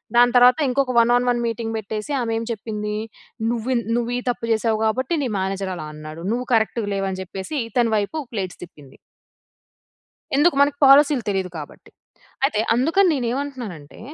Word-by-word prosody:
దాని 245 0 +6
తర్వాత 245 0 +6
ఇంకొక 260 0 +1
వన్ 235 +1 +4
ఆన్ 245 0 +1
వన్ 240 -1 +1
మీటింగ్ 225 0 -3
బెట్టేసి. 215 +4 -5
ఆమె 230 -1 -2
ఏం 230 - -3
చెప్పింది. 210 -1 -4 0.6
నువ్వి 240 +2 -1
న్ - - -5
నువ్వు 240 0 -1
ఈ - - -1
తప్పు 230 -1 -3
జేసావు 220 0 +1
కాబట్టి, 255 +7 0
నీ 255 - -1
మేనేజర్ 190 0 -2
అలా 155 -3 -7
అన్నాడు. 155 +2 -9
నువ్వు 250 +1 -3
కరెక్ట్‌గ 225 0 +1
లేవు 195 0 -1
అని 185 - -5
జెప్పేసి. 190 - -6
ఇతని 235 -2 +1
వైపు 210 +10 -2 0.2
ప్లేట్స్ 190 -4 -4
తిప్పింది. 150 -6 -14 1.4
ఎందుకు 295 +2 +4
మనకు 285 0 +2
పాలిసీ‌లు 275 -1 +6
తెలీదు 190 -2 -1
కాబట్టి. 150 -2 -11 0.5
అయితే 275 -6 +2 0.2
అందుకని 330 +10 +3
నేను 250 -5 -1
ఏమంటున్నానంటే, 245 - -6
230 Hz, 170 wpm, -22 LUFS, 195-255 Hz, 1.4 s, దాని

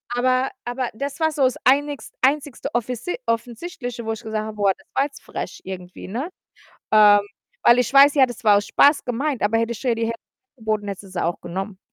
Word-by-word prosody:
Aber 255 +1 +2 0.2
aber 245 0 -2
das 280 +6 -5
war 315 0 +3
so's 265 -4 +1
einigs 285 +2 +2
einzigste 280 0 0
offisi 245 +6 -2
offensichtliche, 240 +1 -4
wo 225 - -1
ich 220 - -8
gesagt 215 -1 -3
habe: 215 -1 -7
„Boah, 200 -2 +3
das 290 - -23
war 275 - +3
jetzt 285 - -10
frech - - -6
irgendwie“, 180 -1 -8
ne? 255 - -4 0.6
Ähm, 205 -1 +7 0.4
weil 240 +1 +6
ich 250 - 0
weiß 280 +2 +7
ja, 270 - +6
das 245 0 -9
war 205 -2 +6
aus 205 - -2
Spaß 285 +1 +4
gemeint, 260 +2 -2
aber 220 +2 +2
hätte 230 +1 -1
ich 225 - -10
ihr 235 -2 +2
die 230 - -2
Hälfte 230 0 -4 0.4
angeboten, 215 -2 -2
hätte 200 0 -6
sie 195 - -14
sie 185 - -2
auch 170 - -1
genommen, 190 +3 -5
235 Hz, 210 wpm, -22 LUFS, 215-270 Hz, 0.6 s, Ähm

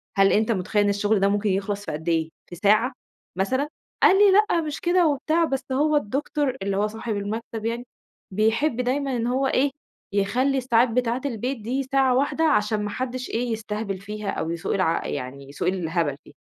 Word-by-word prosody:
هل 195 0 +5
أنت 220 +2 +2
متخيل 205 +1 +1
إن 205 - +2
الشغل 205 +1 +1
ده 195 - +3
ممكن 205 +1 0
يخلص 200 +1 -2
في - - -4
قدّ 160 +3 -4
إيه؟ 160 -1 +1 0.2
في 175 - -9
ساعة 215 +8 +3 0.4
مثلًا؟ 260 +10 0 0.4
قال 385 - +7
لي: 410 -1 +7
"لأ 415 -3 +4
مش 305 -2 -5
كده" 350 -1 +3
وبتاع 315 +3 +1
"بس 270 -3 -3
هو 300 +3 +2
الدكتور 275 +2 -1
اللي 195 0 -1
هو 210 +1 +2
صاحب 220 0 -4
المكتب 220 +2 -4
يعني- 235 +1 -2 0.5
بيحب 230 +5 +1
دايمًا 265 +1 -1
إن 230 - -1
هو 265 +2 +1
إيه، 270 +1 +2 0.4
يخلّي 250 +8 +1
الساعات 245 -1 +3
بتاعة 245 +1 0
البيت 255 0 -2
دي 255 +6 -1
ساعة 265 -1 +2
واحدة 285 +4 +1
عشان 215 -8 +2
ما 205 - -2
حدّش 255 +3 -4
إيه 235 +1 -1
يستهبل 210 -2 -3
فيها 210 +1 -5
أو 160 - -2
يسوق 170 +3 -2
الع 185 -4 0
يعني 135 0 -6
يسوق 140 - -3
الهبل 165 -5 0
فيها."، - - -17
225 Hz, 195 wpm, -24 LUFS, 200-265 Hz, 0.5 s, قال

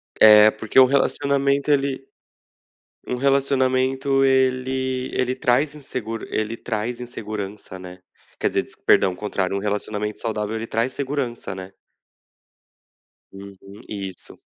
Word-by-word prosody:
É, 105 0 +8
porque 110 +4 +1
o 130 - +9
relacionamento 140 +1 +1
ele 135 -1 0 1.0
um 125 - -2
relacionamento 135 0 +1
ele 130 0 +1
ele 130 0 0
traz 130 +3 +1
inseguro 115 -6 -6
ele 110 +1 -2
traz 115 +1 -4
insegurança, 105 -5 -7
né? 90 0 -10 0.4
Quer - - +1
dizer, - - 0
descu - - -15
perdão, 95 - +4
o - - -9
contrário. 100 -1 -2
Um - - -2
relacionamento 105 +1 -3
saudável 110 -1 -3
ele 115 0 -4
traz 115 +3 -1
segurança, 135 -7 -3
né. 95 0 -9 1.6
Uhum, 100 +2 -12
isso. 95 -3 -7
120 Hz, 125 wpm, -22 LUFS, 105-130 Hz, 1.6 s, o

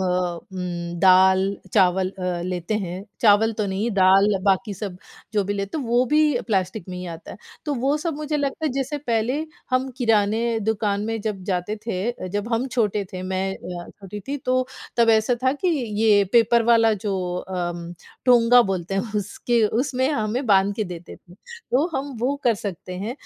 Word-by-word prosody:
उम, 180 -1 -3
दाल 190 0 +6 0.3
चावल 185 -1 +3
अ, 180 -2 -3
लेते 180 +2 -3
हैं, 185 -1 -5 0.2
चावल 220 +1 +5
तो 210 - 0
नहीं, 200 +4 -1
दाल 195 0 +5 0.2
बाकी 200 +1 +1
सब 195 -1 -6 0.4
जो 205 -2 +1
भी 200 - -2
लेते 200 +8 -3
हैं, 280 - -3
वो 240 +2 +2
भी 300 -2 +3
प्लास्टिक 190 -2 -1
में 180 - -5
ही 180 - -6
आता 165 -1 -8
है। - - -9 0.3
तो 295 -2 -1
वो 270 +3 +1
सब 320 +1 -3
मुझे 300 0 -2
लगता 285 +2 -2
है - - 0
जैसे 275 +2 -2
पहले 250 +3 -1 0.3
हम 255 +1 +1
किराने 225 -1 +2
दुकान 205 -1 0
में 225 0 -2
जब 205 -3 -4
जाते 185 +2 -2
थे। 210 +1 -1
अ, 240 - -7
जब 205 +4 -3
हम 230 +3 +1
छोटे 215 -5 0
थे, 185 -1 -5
मैं 190 +1 -2
अ, 175 -2 -8
छोटी 200 +1 -8
थी 285 - -1
तो 255 -1 0 0.3
तब 230 -1 +5
ऐसा 220 +2 +3
था 260 0 +3
कि 290 +6 -1 0.3
ये 205 -2 +5
पेपर 235 0 +5
वाला 225 -1 +4
जो 195 -2 0 0.2
अम, 175 -2 -4 0.3
टोंगा 245 -1 +6
बोलते 190 -3 -3
हैं 200 +2 -2
उसके 225 +3 0 0.2
उसमें 260 -1 0
हमें 240 -1 -1
बाँध 200 -1 +4
के 215 - -1
देते 175 -2 -9
थे, 175 - -19
तो 335 - -2
हम 275 -1 -4
वो 260 +4 +1
कर 240 -2 +4
सकते 185 -3 -6
हैं। 210 +5 -3
210 Hz, 190 wpm, -23 LUFS, 185-245 Hz, 0.4 s, दाल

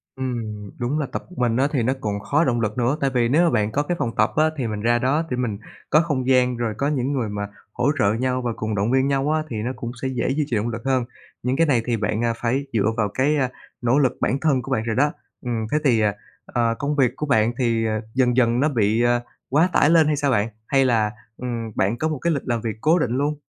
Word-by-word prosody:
Ừm, 115 -6 -4
đúng 125 +5 -1
là 150 - 0
tập - - -4
một 180 - -14
mình 120 -2 +1
thì 130 -6 +1
nó 130 +3 +2
cũng 105 -3 -2
khó 140 +10 +1
động 120 -6 +1
lực 105 0 -2
nữa. 125 +4 +1
Tại 135 - +2
vì 120 -2 +2
nếu 165 +6 +4
bạn 105 -6 +1
có 145 +5 0
cái 175 +4 -2
phòng 115 - -2
tập - - +3
á, 155 - +4
thì 125 -4 -1
mình 105 -1 -4
ra 120 +2 +2
đó 135 +5 +1
để 125 - -2
mình 120 -5 -2 0.3
có 155 - +5
không 145 -6 -2
gian 125 -2 +3
rồi 115 -2 -1
có 140 - 0
những 140 -2 0
người 125 -6 -1
mà 100 0 -4 0.3
hỗ 125 +4 +1
trợ 100 +1 +3
nhau 130 +2 -1
và 120 -1 -1
cùng 110 -1 -3
động 105 +3 0
viên 130 +1 +3
nhau 140 +1 +1
á, 155 0 +1
thì 115 - -5
nó 125 - -1
cũng 120 0 -5
sẽ 135 - -1
dễ 125 -3 -1
duy 145 +3 +1
trì 120 - 0
động 110 +3 -1
lực 115 0 -5
hơn. 130 -2 +1 0.4
Những 125 +2 0
cái 165 +1 +3
này 125 -5 +3
thì 120 -2 0
bạn 105 +1 -1 0.2
phải 130 +4 -1
dựa 110 0 +2
vào 105 -2 +1
cái 140 +4 +2 0.5
nỗ 120 +2 +2
lực 130 -3 +1
bản 130 - +1
thân 140 -4 +2
của - - -8
bạn 110 - +1
rồi 115 -1 -2
đó. 145 +3 +3 0.3
Ừm, 115 -3 -2
thế 150 - +3
thì, 125 -6 +3
ờ, 105 -1 +3 0.3
ờ, 115 -1 0
công 145 +1 -1
việc 130 -4 +3
của 150 - -3
bạn 115 -5 +3
thì 115 -3 +1 0.3
dần 125 -2 +2
dần 120 -1 +3
nó 150 +3 +3
bị 115 -3 +2 0.5
quá 160 +6 +3
tải 150 - +4
lên 165 -2 +5
hay 150 - +2
sao 145 -1 0
bạn? 110 -2 +1 0.2
Hay 135 -1 +3
là, 110 -4 +2 0.3
ừm, 115 -3 -4
bạn 100 +5 +1
có 155 - 0
một 155 -3 -3
cái 170 -1 +1
lịch 140 - -2
làm 120 -2 0
việc 110 -1 -4
cố 160 +5 +4
định 125 - 0
luôn? 145 +2 0
125 Hz, 270 wpm, -22 LUFS, 115-140 Hz, 0.5 s, có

